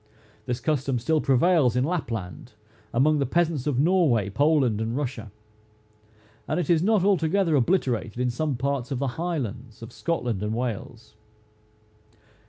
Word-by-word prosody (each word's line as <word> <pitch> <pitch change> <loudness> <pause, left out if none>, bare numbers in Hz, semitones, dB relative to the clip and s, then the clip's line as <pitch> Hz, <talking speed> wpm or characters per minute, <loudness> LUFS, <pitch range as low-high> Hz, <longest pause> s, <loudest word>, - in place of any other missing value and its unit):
This 125 0 -2
custom 135 -1 -1
still 155 +6 +1
prevails 135 -1 +3
in 125 - +2
Lapland, 115 - -4 0.4
among 150 +5 +3
the 140 - +1
peasants 160 -2 0
of 135 -4 0
Norway, 145 - +2
Poland, 140 -5 +2
and 115 +3 -2
Russia; 125 -7 -4 1.2
and - - -1
it 175 - 0
is 165 -2 +3
not 210 0 +2
altogether 190 -2 +2
obliterated 125 - 0
in 125 -1 +1
some 145 +3 -2
parts 135 -1 -2
of 135 - -2
the 135 +1 -1
highlands 125 - -4
of 115 - -10
Scotland 125 - -2
and 105 +1 -2
Wales. 120 -1 -5
135 Hz, 145 wpm, -25 LUFS, 120-160 Hz, 1.2 s, prevails